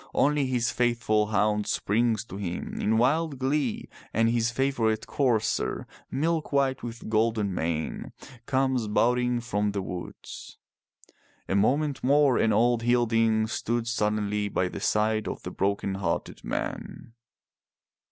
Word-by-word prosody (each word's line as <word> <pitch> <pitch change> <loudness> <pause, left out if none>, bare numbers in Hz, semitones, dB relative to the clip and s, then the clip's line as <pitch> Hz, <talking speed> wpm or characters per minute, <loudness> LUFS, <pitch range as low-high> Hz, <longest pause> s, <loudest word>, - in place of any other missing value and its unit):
Only 145 -1 +3
his 120 -3 0
faithful 115 -2 +1
hound 105 0 +1
springs 110 +1 +1
to 95 - -8
him 90 -4 -4
in 110 +1 +2
wild 145 +5 +2
glee 135 -1 -1 0.3
and 115 +1 +3
his 115 0 +2
favorite 115 -4 0
courser, 125 -6 0 0.2
milk 160 +3 -1
white 135 -2 +1
with 115 0 -7
golden 110 -2 +1
mane, 80 -2 -3 0.4
comes 130 -4 +1
bounding 125 +3 +2
from 105 -3 -1
the 100 - -1
woods. 90 -1 -8 0.9
A - - -1
moment 140 +8 +1
more 140 -1 +4
and 110 - +3
old 120 +2 +3
Hilding 115 -2 +2
stood 115 +1 -2
suddenly 105 -2 0
by 90 -2 0
the - - -6
side 110 0 +1
of - - -5
the - - -5
broken 100 0 -1
hearted 95 -4 -3
man. 115 - -5
115 Hz, 130 wpm, -27 LUFS, 105-125 Hz, 0.9 s, more